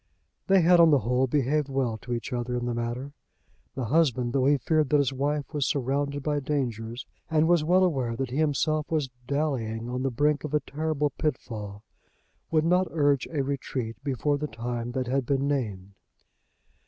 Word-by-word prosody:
They 195 -1 +5
had 175 +1 +5
on 165 -1 +8
the 145 -3 +4
whole 125 +4 +1
behaved 145 +2 +1
well 130 -4 0
to 120 - -9
each 120 +2 -3
other 125 0 -2
in 120 - -3
the 120 - -1
matter. 120 +4 -4 0.6
The 130 - -2
husband, 125 -3 +2
though 135 -1 +2
he 145 0 +4
feared 155 +2 +1
that 150 - +4
his 140 -2 +1
wife 145 +3 -2
was 145 -3 0
surrounded 140 +1 -1
by 145 0 0
dangers, 120 -4 -3 0.2
and 160 0 +3
was 170 -2 +4
well 180 +4 +4
aware 130 -10 0
that 130 +1 -3
he 130 - -3
himself 155 0 +1
was 150 -5 -1 0.2
dallying 120 -6 -1
on 125 0 -2
the 135 - +1
brink 145 +3 +1
of 150 -1 -2
a - - +4
terrible 150 0 -1
pitfall, 110 -9 -4 0.7
would 155 -1 +2
not 180 +2 +3
urge 145 -4 +2
a 150 -4 -1
retreat 130 -4 -3
before 145 +1 0
the 150 - -2
time 120 0 -4
that 130 0 -1
had 135 +2 0
been 140 +2 0
named. 105 -9 -2
140 Hz, 190 wpm, -27 LUFS, 120-150 Hz, 0.7 s, on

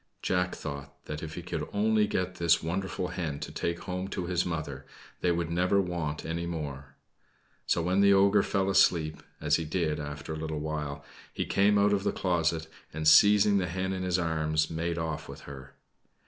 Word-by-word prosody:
Jack 90 0 0
thought 70 0 -8
that 75 0 -5
if 80 -1 -6
he 90 - -6
could 85 -3 -4
only 105 +1 +2
get 95 -3 -2
this 85 -1 +3
wonderful 90 +2 -2
hen 75 -6 -3
to - - -6
take 85 0 -3
home 90 0 -4
to 95 -2 -4
his 90 0 0
mother, 75 -5 -4 0.4
they 90 - +2
would 85 -1 -1
never 90 +3 +2
want 85 -5 -2
any 85 +1 -3
more. 70 -4 -6 0.7
So 85 - +2
when 90 +3 +2
the 100 0 +6
ogre 100 +1 +5
fell 95 -1 0
asleep 85 -5 +3 0.2
as - - +2
he 85 - -3
did 80 -1 -1
after 75 +1 -6
a - - -4
little 80 -1 -3
while 75 -2 -4 0.3
he - - -3
came 100 +1 +3
out 100 0 +4
of 100 -1 +1
the - - +1
closet, 85 -3 0 0.3
and, 80 0 -2
seizing 100 +4 +7
the 90 - -1
hen 95 +2 -2
in 95 - -3
his 90 -1 +1
arms, 80 -2 0
made 85 +1 -2
off 80 -1 -4
with - - -9
her. 70 0 -11
85 Hz, 195 wpm, -29 LUFS, 80-95 Hz, 0.7 s, seizing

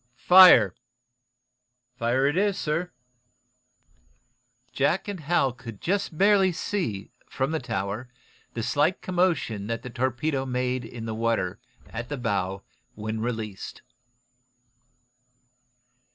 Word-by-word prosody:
"Fire!" 125 - +8 1.2
"Fire 125 +2 +1
it 145 +2 +2
is, 200 +1 +1
sir." 165 +4 -1 1.8
Jack 145 +9 0
and 200 -3 -4
Hal 155 -4 +1
could 115 -5 -10
just 190 -3 -1
barely 195 -1 +4
see, 165 - -3 0.2
from 135 +2 -1
the 160 - 0
tower, 105 0 -4 0.5
the 115 - -2
slight 145 +9 +1
commotion 170 - 0
that 115 +1 -3
the 125 - -7
torpedo 130 +3 -1
made 125 -1 -1
in 115 0 -8
the 110 - -3
water 110 -5 -1 0.3
at 115 +1 -6
the 145 - -3
bow 100 -5 -2 0.3
when 110 +1 -4
released. 110 -4 -5
125 Hz, 110 wpm, -26 LUFS, 115-165 Hz, 1.8 s, Fire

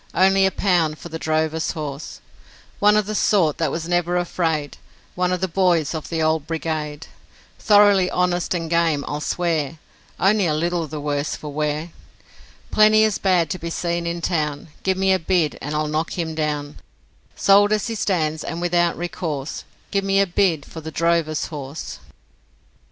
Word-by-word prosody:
Only 190 +1 +4
a - - -1
pound 170 -7 +1
for 170 - -10
the 160 0 -6
drover's 160 0 0
horse; 150 -1 -6 0.6
One 210 +1 +5
of 215 - +2
the 215 - -4
sort 185 -7 +2
that 165 -3 +1
was 165 +3 -4
never 175 0 +1
afraid, 165 -4 -1 0.4
One 180 0 0
of 180 - -1
the 190 - +1
boys 175 -4 +1
of 160 -2 -5
the 165 -1 -1
Old 155 -1 +1
Brigade; 155 -2 -3 0.5
Thoroughly 205 -3 +5
honest 180 0 0
and 165 -1 -3
game, 165 -3 +1
I'll 145 0 -3
swear, 160 -3 -1 0.4
Only 200 -1 +3
a 155 - +1
little 170 +1 -1
the 150 +1 -6
worse 145 0 -2
for 150 -2 -8
wear; 150 +2 -2 0.8
Plenty 215 0 +5
as 215 -2 +1
bad 180 -4 +2
to 185 - -3
be 170 - -5
seen 170 0 -2
in 170 0 -3
town, 150 -3 -2
Give 190 -1 0
me 190 0 +3
a 190 - +2
bid 165 -3 0
and 150 +2 -4
I'll 155 0 0
knock 155 +3 -2
him 165 -2 -2
down; 150 -2 -3 0.6
Sold 205 +1 +5
as 215 -2 +1
he 230 - -3
stands, 160 -7 -1
and 165 - -4
without 175 0 +1
recourse, 160 -4 -4 0.3
Give 200 -1 +1
me 195 0 +2
a 200 - +5
bid 175 -5 +1
for 160 - -9
the 160 - -6
drover's 165 -1 0
horse.' 145 -1 -7
170 Hz, 180 wpm, -22 LUFS, 155-185 Hz, 0.8 s, One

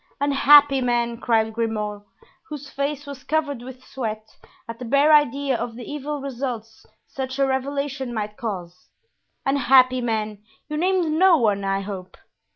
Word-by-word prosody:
"Unhappy 285 0 +5
man!" 240 -1 0
cried 225 -2 +1
Grimaud, 215 -2 -2 0.5
whose 290 -2 -8
face 285 +1 -3
was 280 -2 -9
covered 295 -5 -1
with 255 +1 -11
sweat 220 -4 -6 0.3
at 230 0 -8
the - - -6
bare 280 +5 +4
idea 285 -2 +3
of 235 0 -4
the 240 -1 -8
evil 295 0 -5
results 245 -5 -6 0.2
such 265 0 -5
a 275 - +3
revelation 270 0 -2
might 210 -2 -4
cause; 180 -6 -6 0.6
"unhappy 255 -2 +4
man, 215 -3 -2 0.3
you 300 - -4
named 355 -1 +1
no 370 -2 +6
one, 205 -5 +1
I 195 0 0
hope?" 190 -2 -8
255 Hz, 150 wpm, -23 LUFS, 225-280 Hz, 0.6 s, no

